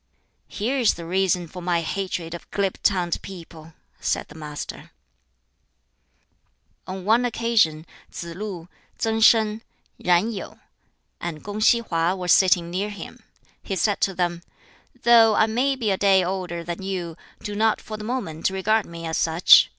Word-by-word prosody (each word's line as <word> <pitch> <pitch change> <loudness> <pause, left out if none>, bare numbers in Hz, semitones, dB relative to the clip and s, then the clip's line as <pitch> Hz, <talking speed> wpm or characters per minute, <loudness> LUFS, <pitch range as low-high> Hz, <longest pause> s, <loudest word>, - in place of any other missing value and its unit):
"Here 250 +7 -2
is 235 - +3
the 170 - -8
reason 185 0 +1
for 180 +2 -9
my 175 -1 0
hatred 175 -1 -3
of 170 - -9
glib 195 -2 -2
tongued 180 -4 +1
people," 165 -4 -11 0.3
said - - -2
the - - -12
Master. 150 -2 -7 2.0
On 185 0 -6
one 225 +4 +4
occasion 225 -10 +1 0.2
Tsz 170 -1 -7
lu, 185 -3 -6 0.3
Tsang 225 0 0
Sin, 220 -1 +5 0.4
Yen 180 +5 +2
Yu, 210 - -7 0.6
and 165 -3 -5
Kung 205 +1 -5
si 235 +2 +5
Hwa 170 -2 0
were 180 -1 -5
sitting 175 -1 +4
near 195 +4 -2
him. 205 - -9 0.4
He 195 - -4
said 205 +2 0
to 195 - +1
them, 175 -1 -1 0.6
"Though 230 -2 +6
I 220 - +5
may 250 +5 +1
be 230 -6 -1
a 190 - +1
day 195 -2 +4
older 180 -2 -3
than 170 +2 -5
you, 180 -4 -4 0.3
do 210 - -4
not 220 +1 +2
(for 215 - -8
the 215 - -7
moment) 205 -10 -2
regard 205 +3 +1
me 170 0 -8
as 160 0 -1
such. 165 +1 +6
190 Hz, 160 wpm, -23 LUFS, 170-215 Hz, 2.0 s, Though